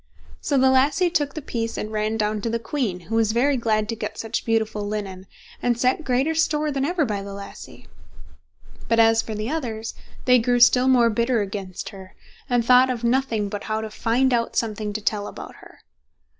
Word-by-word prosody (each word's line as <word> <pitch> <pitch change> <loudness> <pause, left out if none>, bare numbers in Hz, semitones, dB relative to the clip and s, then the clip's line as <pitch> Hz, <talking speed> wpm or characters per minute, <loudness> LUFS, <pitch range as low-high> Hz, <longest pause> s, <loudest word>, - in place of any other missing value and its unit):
So 280 - 0
the 260 0 +5
lassie 295 +7 +3
took 290 -5 0
the 310 - -5
piece 230 -2 -3
and 215 - -4
ran 215 +1 -1
down 210 -1 -1
to 230 - -2
the 230 - 0
queen, 230 -6 -3
who 190 +6 -9
was 220 -1 +2
very 275 +4 +2
glad 215 -3 0
to 230 - -2
get 210 -1 -5
such 225 0 -3
beautiful 220 -2 0
linen, 195 -3 -5 0.3
and 240 -1 0
set 255 +6 +1
greater 270 +3 +1
store 305 -1 +1
than 275 -1 -1
ever 330 +1 +1
by 205 -4 -3
the 200 0 -7
lassie. 200 0 -11 1.0
But 230 - +2
as 225 0 +5
for 220 - -6
the 215 +5 -3
others, 230 -8 -4 0.3
they 250 -1 +6
grew 245 +1 +1
still 250 +1 +6
more 240 -3 +4
bitter 235 +1 +1
against 195 -2 -5
her, 190 -2 -12 0.3
and 245 -2 +1
thought 250 +1 +6
of 245 -2 -3
nothing 235 -4 +1
but 205 0 -6
how 215 0 -1
to 220 -1 -6
find 245 +4 +1
out 230 -1 0
something 215 -2 -1
to 215 - -4
tell 205 0 -1
about - - -9
her. - - -17
230 Hz, 205 wpm, -23 LUFS, 215-260 Hz, 1.0 s, they